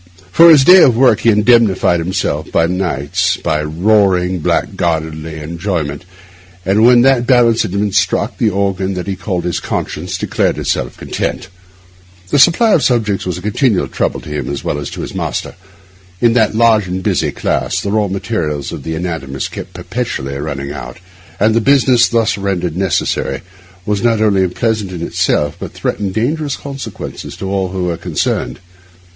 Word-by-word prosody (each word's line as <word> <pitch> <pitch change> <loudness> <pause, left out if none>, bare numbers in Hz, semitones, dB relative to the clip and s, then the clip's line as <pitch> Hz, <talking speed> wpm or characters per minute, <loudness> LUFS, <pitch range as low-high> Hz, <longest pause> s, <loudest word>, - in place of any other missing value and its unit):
For 170 - +7
his 150 -4 +7
day 180 +5 +8
of 125 -7 +5
work 125 -4 +4
he 115 - +2
indemnified 105 -5 +3
himself 90 +3 -2
by 80 - +2
nights 90 0 -1
of 80 +2 -2
roaring, 95 -4 +3
blackguardly 80 -1 -2
enjoyment; 85 -1 -4 0.6
and 100 +4 +2
when 120 0 +6
that 125 -2 +3
balance 120 -3 +4
had 105 - -1
been 100 +2 -1
struck, 100 - 0
the 110 - +3
organ 95 -1 -1
that 90 -1 -4
he 95 - -3
called 90 -1 -3
his 90 - -2
conscience 90 +3 -4
declared - - -1
itself - - -2
content. - - -4 0.8
The 145 - +2
supply 190 - +5
of 160 - +4
subjects 110 -8 0
was 90 -1 -2
a 90 - -9
continual 105 0 +1
trouble - - -2
to - - -10
him 75 -3 -4
as 70 -1 -4
well 75 - -2
as 75 - -5
to - - -7
his - - -6
master. - - -3 0.7
In 120 -1 +3
that 110 -3 +2
large 110 -3 +3
and 95 +1 -4
busy - - 0
class, - - -1
the 100 - -3
raw 105 -1 +1
material 95 -5 -2
of 70 - -6
the 80 - -4
anatomists 80 -6 -4
kept - - -9
perpetually 70 +1 -4
running 70 -1 -5
out; 60 -4 -8 0.4
and 110 +2 +3
the 115 - +2
business 130 -1 +4
thus 115 -2 0
rendered 90 -4 -2
necessary 95 -2 -1 0.4
was 105 -1 -1
not 115 -2 +2
only 100 -3 +3
unpleasant 105 +1 -2
in 85 -2 -5
itself, 75 -3 0
but - - -7
threatened 100 -2 -3
dangerous 145 +5 -1
consequences 140 -1 -7
to 95 - -5
all 95 -1 0
who 95 0 -3
were 85 -2 -2
concerned. - - -2
95 Hz, 175 wpm, -15 LUFS, 85-115 Hz, 0.8 s, day